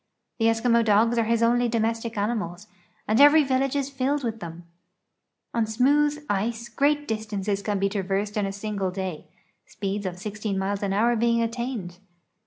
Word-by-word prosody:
The 225 Hz, -, +3 dB
Eskimo 230 Hz, +1 st, +3 dB
dogs 225 Hz, +2 st, +3 dB
are 230 Hz, -, +2 dB
his 230 Hz, +1 st, +1 dB
only 240 Hz, +1 st, +3 dB
domestic 230 Hz, 0 st, -1 dB
animals, 205 Hz, -3 st, -2 dB, 0.4 s
and 220 Hz, +5 st, +3 dB
every 295 Hz, +2 st, +8 dB
village 265 Hz, 0 st, 0 dB
is 280 Hz, -1 st, -1 dB
filled 275 Hz, +1 st, -1 dB
with 225 Hz, -2 st, -3 dB
tliem. 170 Hz, -2 st, -8 dB, 0.9 s
On 230 Hz, -2 st, +1 dB
smooth 290 Hz, +6 st, +2 dB
ice 225 Hz, +4 st, -2 dB
great 290 Hz, +4 st, +1 dB
distances 210 Hz, -2 st, -2 dB
can 205 Hz, 0 st, -1 dB
be 195 Hz, +1 st, +1 dB
traversed 200 Hz, +1 st, -2 dB
in 205 Hz, -2 st, 0 dB
a -, -, -3 dB
single 200 Hz, -1 st, -3 dB
day, 185 Hz, -3 st, -5 dB, 0.4 s
speeds 200 Hz, -1 st, -3 dB
of 180 Hz, -1 st, -5 dB
16 210 Hz, +1 st, -4 dB
miles 195 Hz, +1 st, -2 dB
an 200 Hz, -1 st, -1 dB
hour 230 Hz, +4 st, +2 dB
being 235 Hz, 0 st, +2 dB
attained. 230 Hz, -6 st, -4 dB
220 Hz, 170 wpm, -25 LUFS, 200-240 Hz, 0.9 s, every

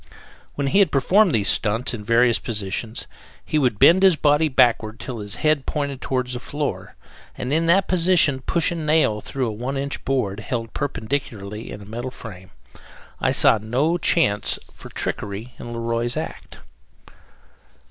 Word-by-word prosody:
When 140 Hz, -, -2 dB
he 140 Hz, +9 st, +2 dB
had 195 Hz, -6 st, +4 dB
performed 185 Hz, +8 st, +3 dB
these 105 Hz, -6 st, 0 dB
stunts 115 Hz, +5 st, +1 dB
in 110 Hz, -3 st, -6 dB
various 115 Hz, +2 st, +3 dB
positions, 110 Hz, 0 st, -3 dB, 0.4 s
he 155 Hz, -, 0 dB
would 125 Hz, -7 st, +1 dB
bend 175 Hz, -, +6 dB
his 190 Hz, -3 st, +6 dB
body 150 Hz, +1 st, +3 dB
backward 115 Hz, -5 st, +2 dB
till 120 Hz, -3 st, -6 dB
his 105 Hz, 0 st, -2 dB
head 155 Hz, +1 st, 0 dB
pointed 140 Hz, -3 st, -3 dB
toward 130 Hz, -1 st, -1 dB
the 125 Hz, 0 st, -5 dB
floor, 145 Hz, +2 st, -5 dB, 0.4 s
and 130 Hz, +3 st, -3 dB
in 165 Hz, +1 st, +1 dB
that 190 Hz, +3 st, +3 dB
position 170 Hz, -6 st, +3 dB
push 170 Hz, +6 st, 0 dB
a -, -, -3 dB
nail 155 Hz, -9 st, +1 dB
through 135 Hz, +3 st, -3 dB
a 115 Hz, -, -2 dB
one 125 Hz, +6 st, -4 dB
inch 140 Hz, +1 st, -4 dB
board 115 Hz, -7 st, -1 dB
held 115 Hz, +1 st, -4 dB
perpendicularly 110 Hz, -6 st, -4 dB
in 105 Hz, -, -8 dB
a -, -, -13 dB
metal 120 Hz, +5 st, -5 dB
frame. 95 Hz, -6 st, -11 dB, 0.7 s
I -, -, +1 dB
saw 110 Hz, -, +5 dB
no 135 Hz, +11 st, 0 dB
chance 105 Hz, -15 st, +1 dB, 0.2 s
for -, -, -12 dB
trickery 105 Hz, +4 st, -5 dB
in 120 Hz, -, -8 dB
Le 120 Hz, -, -5 dB
Roy's 115 Hz, +1 st, -2 dB
act. -, -, -7 dB
125 Hz, 170 wpm, -22 LUFS, 110-150 Hz, 0.7 s, bend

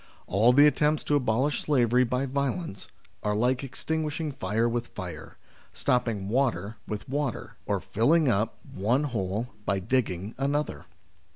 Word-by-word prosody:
All 110 Hz, +6 st, +4 dB
the 145 Hz, +4 st, +7 dB
attempts 150 Hz, 0 st, +3 dB
to 145 Hz, -, +1 dB
abolish 130 Hz, +2 st, +1 dB
slavery 125 Hz, -4 st, +3 dB
by 125 Hz, +2 st, 0 dB
violence, 140 Hz, -, -3 dB, 0.3 s
are 105 Hz, 0 st, 0 dB
like 125 Hz, +5 st, +1 dB
extinguishing 155 Hz, +3 st, -3 dB
fire 110 Hz, -2 st, 0 dB
with 120 Hz, 0 st, -2 dB
fire, 85 Hz, -6 st, -8 dB, 0.4 s
stopping 115 Hz, -6 st, 0 dB
water 110 Hz, -4 st, 0 dB
with 105 Hz, -1 st, -5 dB
water, 140 Hz, -3 st, -3 dB
or -, -, +1 dB
filling 150 Hz, +8 st, +2 dB
up 115 Hz, 0 st, +1 dB, 0.2 s
one 120 Hz, +9 st, +1 dB
hole 110 Hz, -3 st, -2 dB
by 100 Hz, -1 st, 0 dB
digging 100 Hz, -1 st, -1 dB
another. 145 Hz, +2 st, -1 dB
125 Hz, 135 wpm, -27 LUFS, 105-140 Hz, 0.4 s, the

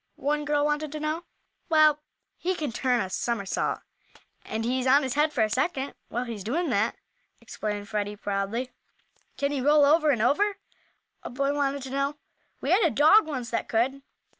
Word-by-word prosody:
one 295 Hz, +1 st, -1 dB
girl 295 Hz, 0 st, +1 dB
wanted 295 Hz, 0 st, -1 dB
to 305 Hz, -, -5 dB
know. 310 Hz, +3 st, -3 dB, 0.4 s
"Well, 310 Hz, -2 st, +5 dB, 0.3 s
he 370 Hz, +1 st, -2 dB
can 300 Hz, -7 st, -3 dB
turn 250 Hz, 0 st, +1 dB
a 190 Hz, -, -3 dB
somersault, 200 Hz, -2 st, -2 dB, 0.6 s
and 225 Hz, +1 st, -4 dB
he's 255 Hz, +2 st, 0 dB
on 275 Hz, +3 st, +5 dB
his 260 Hz, -1 st, -2 dB
head 300 Hz, +2 st, +2 dB
for 245 Hz, -7 st, +1 dB
a 215 Hz, -, +1 dB
second 270 Hz, +2 st, -1 dB, 0.2 s
while 240 Hz, -, -2 dB
he's 230 Hz, -5 st, -6 dB
doing 300 Hz, -, -1 dB
that," 215 Hz, +2 st, +1 dB, 0.4 s
explained 205 Hz, -1 st, -5 dB
Freddie, 210 Hz, -1 st, -2 dB
proudly. 205 Hz, +5 st, -3 dB, 0.7 s
"Can 280 Hz, 0 st, 0 dB
he 280 Hz, -2 st, -1 dB
roll 295 Hz, +2 st, +5 dB
over 310 Hz, +1 st, +4 dB
and 240 Hz, -6 st, +2 dB
over?" 400 Hz, -, +2 dB, 0.6 s
a -, -, -7 dB
boy 275 Hz, +3 st, -1 dB
wanted 280 Hz, -1 st, -1 dB
to 265 Hz, -, -7 dB
know. 275 Hz, +2 st, -1 dB, 0.4 s
"We -, -, -1 dB
had 385 Hz, -, +5 dB
a 340 Hz, -, +4 dB
dog, 315 Hz, +7 st, +5 dB
once, 255 Hz, -6 st, -4 dB
that 230 Hz, -, -2 dB
could." 260 Hz, +5 st, 0 dB
275 Hz, 185 wpm, -26 LUFS, 235-300 Hz, 0.7 s, Well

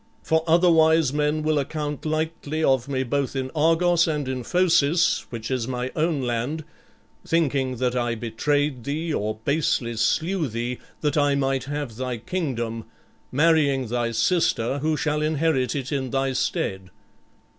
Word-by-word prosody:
For 160 Hz, 0 st, +1 dB
otherwise 160 Hz, -3 st, +4 dB
men 150 Hz, +1 st, 0 dB
will 155 Hz, -1 st, +2 dB
account 150 Hz, +1 st, -4 dB
lightly 155 Hz, 0 st, -2 dB
of 130 Hz, -3 st, +2 dB
me 130 Hz, -1 st, 0 dB
both 140 Hz, +2 st, -1 dB
in 130 Hz, -1 st, -3 dB
Argos 165 Hz, +2 st, +3 dB
and 150 Hz, -4 st, -1 dB
in 130 Hz, -1 st, -3 dB
Phocis, 170 Hz, 0 st, +2 dB
which 115 Hz, 0 st, -6 dB
is 125 Hz, -3 st, -1 dB
my 125 Hz, 0 st, -3 dB
own 155 Hz, -2 st, 0 dB
land, 125 Hz, +6 st, -2 dB, 0.6 s
thinking 140 Hz, -6 st, 0 dB
that 125 Hz, 0 st, -1 dB
I 120 Hz, -1 st, 0 dB
betrayed 125 Hz, +4 st, -1 dB
thee 155 Hz, +5 st, -2 dB
or 110 Hz, -3 st, -2 dB
basely 140 Hz, -5 st, 0 dB
slew 160 Hz, -, +1 dB
thee, 120 Hz, +1 st, -4 dB, 0.2 s
that 150 Hz, -1 st, 0 dB
I 145 Hz, -1 st, +3 dB
might 135 Hz, -1 st, 0 dB
have 145 Hz, -5 st, -4 dB
thy 125 Hz, -1 st, -3 dB
kingdom, 115 Hz, -5 st, -3 dB, 0.5 s
marrying 145 Hz, -4 st, +3 dB
thy 120 Hz, 0 st, 0 dB
sister, 120 Hz, +1 st, +1 dB
who 155 Hz, +1 st, 0 dB
shall 150 Hz, +1 st, 0 dB
inherit 150 Hz, -4 st, +1 dB
it 135 Hz, -1 st, -4 dB
in 135 Hz, -3 st, -1 dB
thy 135 Hz, +1 st, 0 dB
stead. 95 Hz, -6 st, -2 dB
140 Hz, 150 wpm, -24 LUFS, 125-155 Hz, 0.6 s, otherwise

